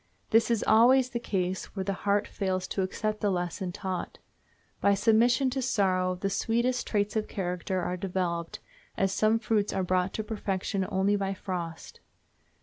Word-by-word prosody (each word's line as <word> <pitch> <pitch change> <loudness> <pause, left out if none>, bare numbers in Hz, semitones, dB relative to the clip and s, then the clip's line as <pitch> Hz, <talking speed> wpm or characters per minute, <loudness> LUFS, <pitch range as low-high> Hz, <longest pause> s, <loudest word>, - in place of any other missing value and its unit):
This 225 +1 +4
is 230 -3 +1
always 250 +3 +5
the 235 - -2
case 190 -5 -2
where 190 - -2
the 195 +1 -1
heart 200 +2 0
fails 185 -2 -2
to 195 - -1
accept 215 +3 -2
the 205 - +2
lesson 180 0 -2
taught. 185 0 -4 0.6
By 200 0 +4
submission 240 +5 +3
to 265 +1 -2
sorrow 185 -7 +1
the 195 +2 -2
sweetest 235 +5 0
traits 205 0 0
of 215 -1 0
character 180 0 -2
are 180 - -2
developed, 180 -3 -3 0.4
as 195 -1 +2
some 215 +2 +3
fruits 215 -2 0
are 190 - 0
brought 185 +1 +1
to 220 - -2
perfection 200 -2 -2
only 195 +2 +2
by 195 -1 -1
frost. 175 -4 -6
195 Hz, 165 wpm, -28 LUFS, 185-220 Hz, 0.6 s, always